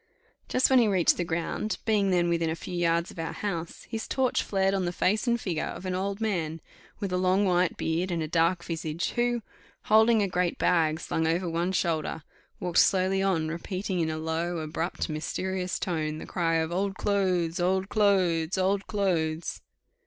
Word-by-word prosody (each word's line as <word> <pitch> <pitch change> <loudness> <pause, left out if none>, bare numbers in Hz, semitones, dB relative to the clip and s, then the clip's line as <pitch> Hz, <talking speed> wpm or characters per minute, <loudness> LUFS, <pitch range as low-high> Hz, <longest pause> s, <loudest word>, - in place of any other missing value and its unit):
Just 260 +1 +3
when 260 - +7
he 235 - +4
reached 190 -4 +3
the 175 - 0
ground, 170 +5 -2
being 210 -3 +2
then 175 -2 +2
within 170 -1 +1
a 160 - -1
few 180 - -8
yards 170 0 +1
of - - -11
our 165 - -3
house, 170 -5 -4
his 225 -1 -5
torch 260 -2 +1
flared 195 -1 +1
on 190 -2 0
the 175 - -1
face 210 +6 +1
and 235 0 +2
figure 175 -7 -2
of 190 - -7
an 185 - -2
old 195 +2 -2
man 170 -8 -1 0.4
with 195 -3 -3
a 180 - +1
long 185 +2 +3
white 180 -1 +2
beard 170 +3 -1
and 170 -2 -1
a - - -3
dark 170 +2 +2
visage, 165 0 -3
who, 240 -1 0 0.4
holding 220 0 +5
a - - +1
great 180 -1 0
bag 160 -3 +2
slung 160 -1 -1
over 175 +3 0
one 170 +2 -1
shoulder, 160 -3 -1 0.4
walked 180 -2 +1
slowly 190 0 +3
on, 180 -5 +1
repeating 185 +3 -3
in 160 -1 +1
a 155 - -3
low, 165 +2 -2
abrupt, 160 +2 -3
mysterious 185 +4 -3
tone, 155 -4 -2
the - - -7
cry 165 -2 0
of 160 0 0
"Old 195 +2 -1
clothes! 185 -5 0
Old 190 +2 +1
clothes! 185 -5 +2
Old 195 +1 +1
clothes!" 170 -5 -1
180 Hz, 190 wpm, -27 LUFS, 165-195 Hz, 0.4 s, when